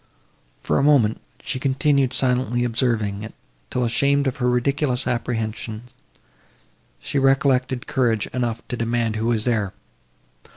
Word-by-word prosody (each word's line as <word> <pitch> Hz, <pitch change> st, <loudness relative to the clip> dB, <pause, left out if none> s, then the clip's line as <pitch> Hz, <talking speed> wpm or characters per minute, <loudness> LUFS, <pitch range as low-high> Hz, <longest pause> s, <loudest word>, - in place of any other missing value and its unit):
For -, -, 0 dB
a -, -, +1 dB
moment, 135 Hz, -7 st, +3 dB, 0.2 s
she 130 Hz, -, -3 dB
continued 135 Hz, 0 st, +2 dB
silently 125 Hz, -2 st, +1 dB
observing 115 Hz, -4 st, 0 dB
it, 110 Hz, -, -8 dB, 0.3 s
till, 125 Hz, -, -1 dB
ashamed 140 Hz, +4 st, +2 dB
of 135 Hz, -1 st, -1 dB
her 125 Hz, -2 st, +1 dB
ridiculous 125 Hz, +1 st, +1 dB
apprehensions, 115 Hz, -1 st, -3 dB, 1.1 s
she 140 Hz, -, -2 dB
recollected 135 Hz, -2 st, +2 dB
courage 115 Hz, -5 st, +1 dB
enough 120 Hz, -2 st, -2 dB
to -, -, -2 dB
demand 115 Hz, -1 st, -1 dB
who 110 Hz, +1 st, -1 dB
was 115 Hz, -2 st, +1 dB
there. 105 Hz, -6 st, 0 dB
125 Hz, 130 wpm, -22 LUFS, 115-130 Hz, 1.1 s, moment